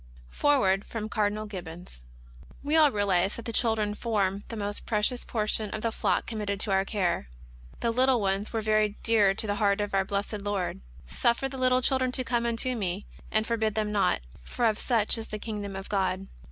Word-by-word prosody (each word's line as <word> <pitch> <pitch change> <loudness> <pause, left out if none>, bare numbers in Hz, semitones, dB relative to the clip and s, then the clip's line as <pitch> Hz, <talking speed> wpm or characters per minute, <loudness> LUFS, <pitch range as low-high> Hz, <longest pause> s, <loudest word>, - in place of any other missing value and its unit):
FOREWORD 200 -10 +3
FEOM 220 -2 -5
OAEDINAL 215 0 0
GIBBONS. 175 - -9 0.6
We 295 +2 +1
all 310 -2 +7
realize 200 -4 +1
that 235 - -8
the 230 - -4
children 220 -4 +2
form 205 -3 -1
the 230 - -6
most 205 -1 -4
pre 210 -2 0
cious 245 +2 +1
portion 215 -1 -1
of 215 +2 -5
the 230 - +1
flock - - 0
committed 210 -3 -3
to 205 - +1
our 190 0 +3
care. 185 - -1 0.5
The 235 - +1
little 255 +1 +3
ones 195 0 -1
were 225 - -1
very 215 -1 +2
dear 210 -4 +4
to 220 - -2
the 205 -1 -1
heart 200 0 +3
of 205 -1 -2
our 195 0 +3
Blessed 200 +1 -3
Lord: 200 - -2 0.2
" - - -22
Suffer 235 - +1
the 265 0 -7
little 255 0 +3
children 260 -1 +2
to 255 - +1
come 235 -1 0
unto 235 +2 0
me, 195 -2 -3 0.2
and 215 0 +1
forbid 220 -2 0
them 215 -1 0
not; 200 - +2 0.2
for 240 - -1
of 220 -1 +2
such 225 -2 +1
is 225 - -6
the 215 - -5
kingdom 205 -2 -5
of 195 +1 -6
God." 195 -1 0
210 Hz, 205 wpm, -28 LUFS, 200-230 Hz, 0.6 s, all